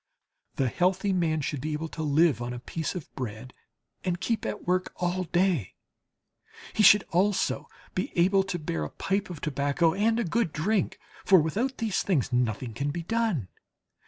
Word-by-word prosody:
The 135 - +1
healthy 185 - +1
man 160 -4 +1
should 140 -1 -3
be 155 +2 -2
able 155 +2 -3
to 160 - -6
live 155 -2 +3
on 120 +1 -3
a 125 - -6
piece 160 +7 -4
of 175 - -7
bread 125 0 -6 0.5
and 180 -2 -1
keep 230 +2 -1
at - - -5
work 185 +1 0
all 180 +1 -1
day. 175 - +1 1.0
He - - +1
should 205 0 +8
also 190 +2 +1 0.2
be 185 - -2
able 190 +3 +4
to 185 -2 -2
bear 85 - -3
a 75 - -4
pipe 200 +1 -2
of 170 -5 -7
tobacco 145 +3 +1
and 225 +4 +2
a - - +1
good 200 -2 0
drink; 195 +5 0 0.3
for 190 -2 +6
without 220 - -1
these 220 -4 0
things 145 - 0
nothing 120 -1 0
can 140 +6 -2
be 170 +4 -4
done. 210 - 0
170 Hz, 180 wpm, -27 LUFS, 145-195 Hz, 1.0 s, should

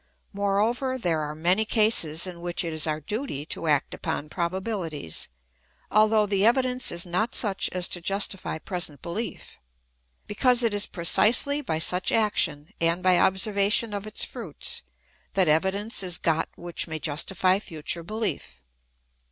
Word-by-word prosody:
Moreover 215 +6 0
there 170 -9 0
are 150 0 -5
many 180 +7 +2
cases 210 -8 +1
in 175 -2 -7
which 175 +1 -3
it 165 -1 -4
is 155 0 0
our 155 0 -1
duty 180 - -4
to 165 - -2
act 145 -2 +1
upon 150 - -4
proba 175 +3 -2
bihties, 170 - -4 0.6
although 215 0 +4
the 200 -1 0
evidence 250 +2 +3
is 170 +1 -1
not 185 +7 -1
such 200 -4 +2
as 180 -1 0
to 175 - -4
justify 195 -1 -1
present 160 -5 -3
behef; 210 +7 -5 0.7
because 245 +3 +2
it 230 -3 +1
is 205 0 +2
precisely 230 - +3
by 160 - -2
such 180 +3 +1
action, 170 -9 +1
and 170 +2 +1
by 185 -1 +4
observation 200 +3 +2
of 205 +1 -5
its 215 - -1
fruits, 220 - -2 0.5
that 190 -3 +4
evidence 190 +9 +1
is 180 -2 +1
got 165 -1 0
which 175 0 -1
may 160 -1 -4
justify 185 +5 +1
future 170 -3 -1
belief. 210 - -4
185 Hz, 150 wpm, -25 LUFS, 165-215 Hz, 0.7 s, although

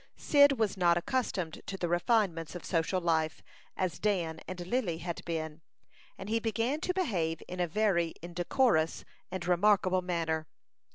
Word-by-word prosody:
Cyd 285 -1 +5
was 220 -6 0
not 175 -2 +4
accustomed 185 -5 -2
to 195 - -4
the 175 - -1
refinements 175 -2 +1
of 175 - -7
social 170 +2 0
life, 160 -2 0 0.3
as 185 -2 -1
Dan 175 -6 0
and 180 -1 -6
Lily 185 -5 -1
had 170 0 -5
been, 160 -1 -4 0.6
and - - -8
he 225 +2 +1
began 230 +6 -1
to 365 - 0
behave 180 - -1
in 180 - -6
a 175 - +1
very 170 -3 +1
indecorous 175 0 +1 0.2
and 185 -1 -4
remarkable 185 0 +3
manner. 165 -3 -1
180 Hz, 155 wpm, -31 LUFS, 165-210 Hz, 0.6 s, Cyd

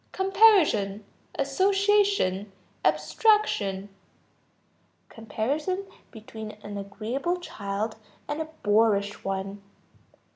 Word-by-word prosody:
Comparison, 365 - +4 0.3
association, 390 - +2 0.3
abstraction. 195 - +2 1.2
Comparison 290 - -3 0.2
between 220 -1 -9
an 205 0 -7
agreeable 225 - -3
child 210 - -4 0.3
and 295 +2 -3
a 315 - -5
boorish 205 -1 +2
one. 195 +1 -4
220 Hz, 70 wpm, -26 LUFS, -, 1.2 s, Comparison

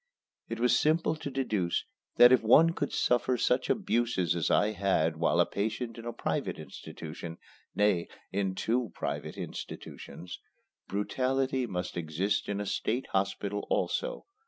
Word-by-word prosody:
It - - -4
was 125 +1 +4
simple 160 +1 +2
to 150 - -5
deduce 110 -10 -1 0.3
that 120 0 +9
if 130 - +6
one 155 +9 +6
could - - -2
suffer 125 +1 +2
such 125 +2 +1
abuses 115 - +1
as 85 - 0
I 105 +1 +3
had 95 -6 +1
while 85 - +2
a - - +6
patient 110 +3 -3
in 115 - -9
a - - -2
private - - -2
institution 80 +1 -8 0.4
nay, 105 -5 +2 0.2
in 95 -1 -1
two 120 +3 0
private - - -4
institutions 90 +1 -7 0.5
brutality 130 +5 0
must 90 -3 -4
exist 85 +6 -1
in 100 0 -1
a 105 - -2
state 120 +5 -1
hospital 100 +1 -1
also. - - -1
110 Hz, 145 wpm, -30 LUFS, 95-125 Hz, 0.5 s, that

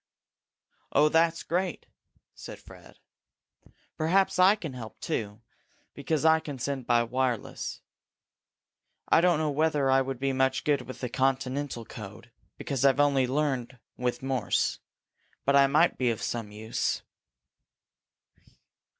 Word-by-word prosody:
"Oh, 150 +2 +4
that's 165 +1 +2
great!" 180 0 -2 0.5
said - - -10
Fred. - - -16 1.0
"Perhaps 185 +4 +2
I 190 +3 +7
can 160 -10 -7
help, 115 -3 -9
too, 105 0 -4 0.5
because 155 -1 -2
I 160 0 +6
can 145 -3 -7
send 130 0 -4
by 120 0 +4
wireless. 125 -1 -3 1.3
I - - +5
don't 175 -2 +3
know 155 -1 0
whether 145 -2 +1
I 135 0 +5
would 135 -1 -4
be 135 +1 -1
much 130 0 +1
good 145 -2 +1
with 130 - -10
the 125 - -3
Continental 135 -1 -1
code, 105 +3 -10 0.3
because 140 -2 -3
I've 135 -1 +5
learned 140 -3 +3 0.4
only 125 - -24 0.2
with 125 +1 -1
Morse. 130 -6 0 0.7
But 140 - +3
I 140 -1 +6
might 155 +5 +3
be 125 -2 +2
of 115 - -3
some 115 -3 -3
use." 110 +2 -2
135 Hz, 135 wpm, -28 LUFS, 125-155 Hz, 1.3 s, I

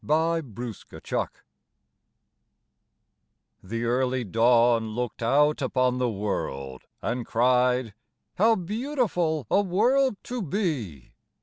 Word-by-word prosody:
"A 165 +2 +2
DAY 120 -5 -9 0.3
IN - - -10
JUNE" - - -1 2.3
The 115 +5 -4
Early 125 +1 0
Dawn 115 +1 +3
looked 120 -1 -4
out 145 +6 +3
upon 130 -1 +1
the 125 -1 +1
world 70 - -4 0.2
And 120 +1 -2
cried, 125 0 +2 0.5
"How 225 +3 +5
beautiful 195 - -1
a 200 - +5
world 225 +6 +2
to 245 -1 -4
be!" 145 - -3
130 Hz, 105 wpm, -26 LUFS, 115-175 Hz, 2.3 s, How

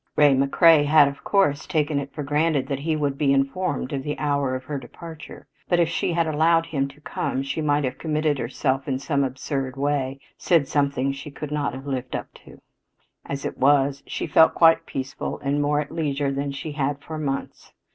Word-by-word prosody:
Ray 145 -2 +6
McCrea 145 +3 +5
had, 150 -1 +6
of 140 - -11
course, 160 -8 +1
taken 150 -2 0
it 140 0 -6
for 150 - -5
granted 145 -1 +1
that 135 -1 -2
he 155 +2 -1
would 145 -2 -1
be 145 -3 +3
informed 135 0 -1
of 135 - -2
the 150 +2 -4
hour 140 -3 0
of 130 - -5
her 140 +1 -4
departure, 160 +4 -11 0.2
but 175 - +3
if 170 - +4
she 170 - -1
had 170 0 +2
allowed 165 +2 +3
him 140 -4 -1
to 140 +2 -16
come 135 -2 -3
she 135 +3 -3
might 145 -1 +1
have 130 -1 -3
committed 155 -2 0
herself 135 +2 -1
in 135 -2 0
some 140 +1 0
absurd 130 0 -3
way 135 -1 -1 0.2
said 165 -6 +2
something 140 -1 0
she 135 +2 -8
could 145 +1 -7
not 145 -4 -1
have 135 +1 -9
lived 130 -2 -3
up - - -6
to. - - -16 0.7
As 140 0 -4
it - - -5
was, 140 0 +3
she - - -3
felt 160 - +5
quite 165 0 +5
peaceful 135 0 -4
and 145 +1 0
more 145 0 +1
at 145 - -8
leisure 145 -4 -1
than 140 +1 -2
she 145 +3 -6
had 145 -1 -2
for 155 -1 -6
months. 140 -3 -4
145 Hz, 205 wpm, -24 LUFS, 135-155 Hz, 0.7 s, Ray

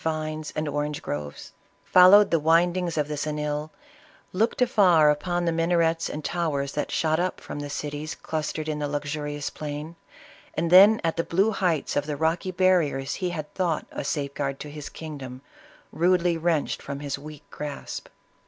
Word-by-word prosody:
119 155 -1 -2
vines* 155 - -7
and 155 0 -2
orange 145 +1 -2
groves, 75 0 -6 0.3
followed 185 +3 +7
the 165 - +3
windings 170 +2 +2
of 150 -1 +1
the 150 - -4
Xeuil, 150 0 -3 0.6
looked 220 +5 +1
afar 185 - +5
upon 175 +4 -1
the 170 - +2
minarets 165 0 +1
and 150 0 -6
towers 145 -5 -1
that 150 - -3
shot 160 0 +1
up 185 +1 -1
from - - -7
the 145 0 -5
cities 150 +2 -4
clustered 155 0 -4
in 150 -1 -2
the 145 - -1
luxurious 145 0 -3
plain, 150 +2 -6 0.6
and 165 +1 -1
then 200 +4 +8
at 165 0 0
the 165 - +1
blue 195 +7 +2
heights 180 -7 0
of 145 +1 0
the 150 -1 -3
rocky 160 +4 0
barriers 175 -7 +2
he 180 - 0
had 155 -4 -6
thought 175 -5 -1
a - - -5
safeguard 140 -1 -3
to 150 - -7
his 150 -1 -7
kingdom, 140 -5 -8 0.5
rudely 175 0 +2
wrenched 165 -2 0
from 140 0 -6
his 140 -2 -4
weak 150 0 -11
grasp. 145 -2 -6
155 Hz, 170 wpm, -25 LUFS, 145-175 Hz, 0.6 s, then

